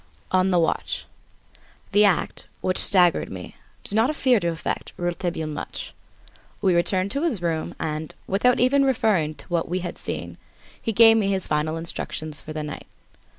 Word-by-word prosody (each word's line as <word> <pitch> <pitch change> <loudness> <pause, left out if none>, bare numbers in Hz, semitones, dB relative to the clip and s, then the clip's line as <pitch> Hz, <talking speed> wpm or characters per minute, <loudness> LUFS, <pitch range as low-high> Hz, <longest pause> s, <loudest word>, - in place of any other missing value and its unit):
On 185 0 +3
the 180 - +3
Watch 165 -1 -1 0.9
The 210 +1 +5
act, 195 -4 0
which 185 - +2
staggered 180 -3 +4
me, - - -8 0.3
did - - -5
not 225 +4 +3
appear 260 -6 +3
to 170 - -2
affect 165 -1 -3
Rouletabille 175 -2 -2
much. 150 -1 -6 0.7
We 190 -3 +2
returned 185 +3 +2
to 280 - 0
his 310 - 0
room 160 -2 -2
and, 155 0 -4
without 235 +6 +2
even 275 +3 +4
referring 210 - +1
to - - -11
what 170 -2 -1
we 180 +1 -1
had 175 - -6
seen, - - -5 0.4
he 225 - -1
gave 225 +1 +7
me 210 -3 +1
his 190 -2 -1
final 155 +1 -1
instructions 155 -2 -5
for 155 - -9
the 155 0 -4
night. 150 - -7
180 Hz, 170 wpm, -24 LUFS, 160-215 Hz, 0.9 s, gave